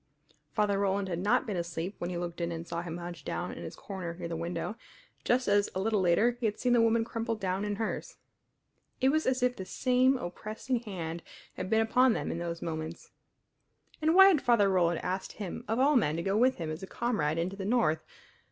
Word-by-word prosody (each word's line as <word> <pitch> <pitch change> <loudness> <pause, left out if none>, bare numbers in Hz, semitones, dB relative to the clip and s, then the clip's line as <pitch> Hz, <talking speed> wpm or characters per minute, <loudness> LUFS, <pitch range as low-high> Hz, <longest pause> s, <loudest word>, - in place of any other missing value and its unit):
Father 205 +2 +1
Roland 200 -1 0
had 170 -1 -2
not 215 +8 +2
been 210 -5 -3
asleep 170 +2 -3
when 175 - -3
he 180 - -3
looked 175 0 -4
in 170 0 -1
and 165 0 -5
saw 170 - -3
him 170 -1 -5
hunched 175 -3 -7
down 175 - -3
in - - -8
his - - -7
corner 185 -4 -6
near 170 -1 -5
the 165 - -4
window, 170 +5 -3 0.5
just 250 +1 +2
as 205 0 +3
a - - 0
little 210 0 +1
later 185 +7 +4
he 230 - +1
had 210 - -3
seen 250 -1 +2
the 240 - +5
woman 230 0 +3
crumpled 230 -1 -3
down 190 0 -1
in 205 0 -1
hers. 220 +1 -4 0.8
It 265 - +4
was 310 +3 +1
as 255 -1 +1
if 250 0 +2
the 190 - -6
same 255 +6 +2
oppressing 215 +5 -3
hand 170 -7 -5 0.3
had 185 - -5
been 220 +1 +4
upon 250 +2 +4
them - - -2
in 165 - -3
those 170 -1 -4
moments. 160 0 -5 0.9
And 315 +2 +3
why 385 +1 +10
had 325 -7 +3
Father 230 -5 +4
Roland 175 -3 +2
asked 185 +1 -3
him 200 -4 -6
of 225 - 0
all 280 +3 +4
men 155 - +3
to 170 - -2
go 195 +2 0
with 255 +4 +4
him 160 -2 -4
as 155 +4 -6
a 190 - -6
comrade 180 -12 -1
into 175 +4 -1
the 195 - -5
North? 195 -8 +2
195 Hz, 225 wpm, -30 LUFS, 170-230 Hz, 0.9 s, why